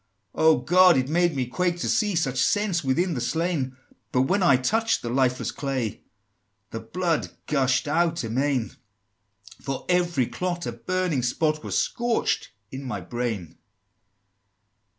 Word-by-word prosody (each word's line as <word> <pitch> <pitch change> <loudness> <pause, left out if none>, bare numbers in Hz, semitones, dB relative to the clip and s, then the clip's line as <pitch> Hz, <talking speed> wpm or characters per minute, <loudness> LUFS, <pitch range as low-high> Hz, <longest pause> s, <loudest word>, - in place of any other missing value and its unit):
XVIII. - - -2
"Oh, 160 -1 +7
God! 180 -1 +6
it 130 +1 0
made 175 0 +2
me 130 -2 0
quake 175 +8 -1
to 170 - -3
see 210 -3 +1
Such 135 -6 0
sense 205 -5 +1
within 170 +7 +1
the 125 - -3
slain! 145 -2 -1 0.3
But 125 - +3
when 190 +8 +1
I 140 -8 +5
touched 225 - 0
the 120 - -3
lifeless 130 0 +1
clay, 130 -6 -3 0.7
The 115 - -4
blood 165 +9 -1 0.2
gush'd 130 -2 +1
out 165 +1 +1
amain! 125 +1 0 0.9
For 135 -1 -4
every 175 -7 +2
clot, 175 +5 -3
a - - -2
burning 175 +4 -1
spot 155 +5 0
Was - - -2
scorching 240 -1 0 0.2
in 135 +1 -6
my 110 -7 -4
brain!" 110 -2 -4
145 Hz, 150 wpm, -25 LUFS, 125-175 Hz, 0.9 s, Oh